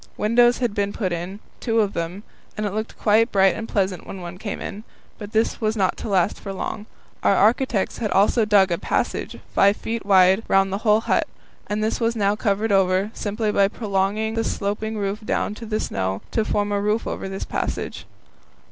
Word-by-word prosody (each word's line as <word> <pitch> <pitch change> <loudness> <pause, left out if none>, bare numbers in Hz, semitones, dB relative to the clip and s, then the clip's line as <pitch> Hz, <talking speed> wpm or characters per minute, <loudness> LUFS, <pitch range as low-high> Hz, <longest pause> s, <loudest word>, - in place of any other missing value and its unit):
Windows 240 +3 +4
had 240 -4 -1
been 200 -1 -1
put 190 -5 -2
in 175 +4 -5 0.2
two 230 -2 +1
of 205 -2 +1
them 170 +4 -4 0.3
and 210 - -1
it 200 - -2
looked 220 +1 -4
quite 220 +2 +3
bright 195 -1 +4
and 225 - -6
pleasant 190 -4 -1
when 195 - -7
one 175 0 -8
came 205 - -4
in; 205 +2 -6 0.4
but 205 -1 -8
this 225 +1 0
was 220 0 0
not 190 -2 +1
to - - -5
last 190 -1 +1
for 195 - -6
long. 210 +2 -5 0.3
Our 200 - +3
architects 220 0 +2
had 220 -3 -1
also 205 +4 +3
dug 200 -3 +4
a 170 - 0
passage, - - -2 0.2
5 200 +1 +4
feet 230 0 -4
wide, 190 0 +5
round 195 0 +3
the 195 - -1
whole 215 -1 +3
hut, - - +1 0.4
and 210 +1 -1
this 220 - -1
was 230 0 +1
now 205 -2 +2
covered 210 0 0
over, 195 +1 +2
simply 210 +1 -2
by 200 -1 +4
prolonging 205 +1 -1
the 225 0 0
sloping 215 +2 -2
roof 200 0 -2
down 210 - -1
to 225 +1 -9
the 215 0 -1
snow 95 0 -2
to 225 - +1
form 205 -1 -1
a 200 0 0
roof 210 +2 0
over 195 - -4
this 195 0 -5
passage. - - -4
205 Hz, 205 wpm, -23 LUFS, 195-220 Hz, 0.4 s, wide